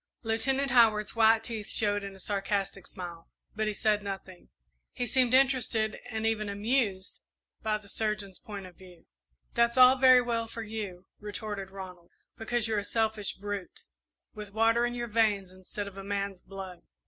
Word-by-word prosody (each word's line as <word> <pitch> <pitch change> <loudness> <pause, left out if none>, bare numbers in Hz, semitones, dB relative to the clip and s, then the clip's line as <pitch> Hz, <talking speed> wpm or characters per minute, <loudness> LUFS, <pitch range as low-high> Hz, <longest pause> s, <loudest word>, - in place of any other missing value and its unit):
'" - - -50
Lieutenant 265 +4 +1
Howard's 220 -4 +4
white 225 0 +5
teeth 225 -3 -6
showed 205 -1 +1
in 195 -1 -7
a - - -14
sarcastic 195 -1 -2
smile, 170 -3 -8 0.3
but 215 0 -1
he 215 - 0
said 210 0 +2
nothing. 195 -2 -7 0.4
He 245 - -2
seemed 255 0 +3
interested 250 -5 +2
and 220 -2 -2
even 215 -2 0
amused 205 -2 0 0.4
by 215 -1 0
the 210 -1 -16
surgeon's 210 -2 -2
point 200 -3 -8
of 180 -1 -13
view. 180 -2 -16 0.5
"That's 235 +1 +2
all 255 +1 +8
very 255 -1 +7
well 230 -1 -1
for 230 0 -6
you," 205 -4 -6
retorted 205 -1 -5
Ronald, 185 -3 -10 0.3
"because 230 0 -1
you're 220 -2 +1
a - - -4
selfish 220 -1 0
brute, 200 -2 -5 0.5
with 210 -2 -9
water 230 +2 +3
in 240 - -4
your 240 0 -3
veins 210 -4 +1
instead 185 +2 -7
of 195 -1 -9
a - - -7
man's 200 -1 -3
blood. 190 -2 -9
210 Hz, 170 wpm, -29 LUFS, 195-230 Hz, 0.5 s, all